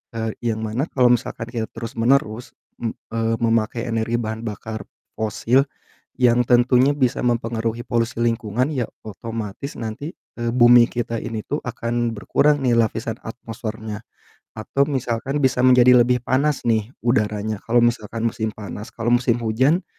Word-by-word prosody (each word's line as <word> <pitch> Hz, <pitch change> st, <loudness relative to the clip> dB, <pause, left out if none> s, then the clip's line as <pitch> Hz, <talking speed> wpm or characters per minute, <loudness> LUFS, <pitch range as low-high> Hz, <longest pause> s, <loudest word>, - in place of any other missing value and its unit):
Eee, 110 Hz, -1 st, -2 dB
yang 110 Hz, -2 st, -1 dB
mana 120 Hz, +9 st, -1 dB
kalau 125 Hz, -2 st, +3 dB
misalkan 115 Hz, 0 st, -6 dB
kita 115 Hz, -3 st, -3 dB
terus-menerus, 115 Hz, 0 st, -1 dB, 0.2 s
m 115 Hz, -2 st, -3 dB, 0.2 s
eee, 115 Hz, 0 st, 0 dB
memakai 115 Hz, +1 st, +1 dB
energi 115 Hz, +1 st, -1 dB
bahan 110 Hz, -1 st, -3 dB
bakar 110 Hz, 0 st, -6 dB, 0.3 s
fosil 115 Hz, +5 st, +1 dB, 0.5 s
yang 120 Hz, 0 st, +4 dB
tentunya 125 Hz, +3 st, +4 dB
bisa 135 Hz, -2 st, 0 dB
mempengaruhi 115 Hz, -1 st, -1 dB
polusi 115 Hz, 0 st, 0 dB
lingkungan 115 Hz, +2 st, 0 dB
ya 125 Hz, -3 st, 0 dB, 0.2 s
otomatis 115 Hz, +4 st, -6 dB
nanti, 120 Hz, +8 st, -5 dB, 0.3 s
eee, 120 Hz, 0 st, -1 dB
bumi 120 Hz, -1 st, +7 dB
kita 115 Hz, -1 st, -3 dB
ini 110 Hz, -1 st, -4 dB
tuh 145 Hz, -, -2 dB
akan 120 Hz, -1 st, -2 dB
berkurang 145 Hz, +7 st, +2 dB
nih 120 Hz, -2 st, +3 dB
lapisan 115 Hz, 0 st, 0 dB
atmosfernya. 110 Hz, -1 st, -6 dB, 0.5 s
Atau 135 Hz, +6 st, +1 dB
misalkan 130 Hz, 0 st, -2 dB
bisa 130 Hz, -1 st, +2 dB
menjadi 125 Hz, -1 st, +6 dB
lebih 125 Hz, -1 st, 0 dB
panas 140 Hz, +2 st, +1 dB
nih 110 Hz, -2 st, +1 dB, 0.2 s
udaranya, 105 Hz, -3 st, 0 dB
kalau 120 Hz, +1 st, +4 dB
misalkan 115 Hz, -1 st, -1 dB
musim 110 Hz, -1 st, -1 dB
panas, 105 Hz, 0 st, -7 dB
kalau 120 Hz, +1 st, -1 dB
musim 120 Hz, -2 st, +2 dB
hujan 130 Hz, -, +2 dB
115 Hz, 145 wpm, -22 LUFS, 110-125 Hz, 0.5 s, bumi